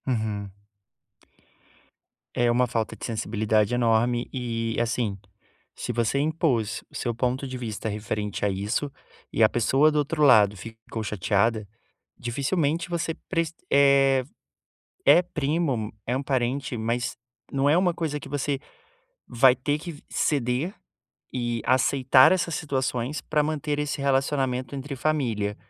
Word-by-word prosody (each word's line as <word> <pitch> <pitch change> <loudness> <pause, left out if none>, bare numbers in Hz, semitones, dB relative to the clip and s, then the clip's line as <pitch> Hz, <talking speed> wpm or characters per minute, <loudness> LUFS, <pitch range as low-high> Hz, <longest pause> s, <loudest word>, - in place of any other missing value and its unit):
Uhum. 110 -5 -2 1.8
É 120 0 +2
uma 120 +1 +3
falta 115 -2 -2
de - - -7
sensibilidade 110 -1 0
enorme 120 0 +1
e 115 -3 -3
assim, 115 -3 -1 0.6
se - - -4
você 120 +2 0
impôs 145 -7 0
o - - -17
seu 120 - -2
ponto 125 +3 -1
de 130 -1 -5
vista 110 -2 -4
referente 105 -1 -3
a - - +2
isso 105 +9 -2 0.4
e 115 - +3
a 110 - +6
pessoa 135 +6 +3
do 150 - -1
outro 150 +1 0
lado 105 -7 +6
ficou 115 +1 -8
chateada, 105 +2 0 0.5
dificilmente 145 +7 -1
você 170 -1 -1
preci 165 -2 -1 0.2
eh, 140 -1 +5 0.8
é 175 - +7
primo, 145 -8 -1
é 125 - -1
um 135 - -1
parente, 130 -1 -1
mas 115 +2 -2 0.4
não 135 0 +1
é 145 - +5
uma 180 -1 +2
coisa 155 -3 -3
que - - -10
você 145 0 -1 0.7
vai 125 +1 +5
ter 145 +3 -1
que 155 -2 -9
ceder 140 - 0 0.6
e 120 -2 -2
aceitar 130 0 +5
essas 175 -3 +1
situações 135 -2 -2
pra 150 -1 +1
manter 150 -1 -2
esse 150 -1 -2
relacionamento 135 -2 0
entre 140 +1 -5
família. 120 -9 -1
130 Hz, 135 wpm, -25 LUFS, 115-145 Hz, 1.8 s, é